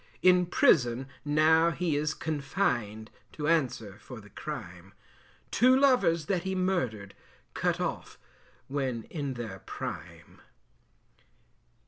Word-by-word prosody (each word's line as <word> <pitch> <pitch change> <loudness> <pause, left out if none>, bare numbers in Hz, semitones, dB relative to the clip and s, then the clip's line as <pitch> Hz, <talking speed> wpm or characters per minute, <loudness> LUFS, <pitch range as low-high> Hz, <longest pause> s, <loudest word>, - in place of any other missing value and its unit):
In 180 -1 +5
prison 130 -7 +3 0.2
now 155 +3 +4
he 170 -2 -1
is 150 +1 -1
confined, 125 - -2 0.2
To 150 -1 -3
answer 120 -10 0
for 120 +1 -10
the 105 -1 -16
crime. 95 - -8 0.6
Two 255 +3 +5
lovers 250 - +3
that 185 +1 0
he 190 +1 -3
murdered, 130 - -1 0.4
Cut - - 0
off - - -4 0.5
when 130 -4 -2
in 140 -5 -3
their 110 -6 -6
prime. - - -8
145 Hz, 110 wpm, -29 LUFS, 115-170 Hz, 0.6 s, In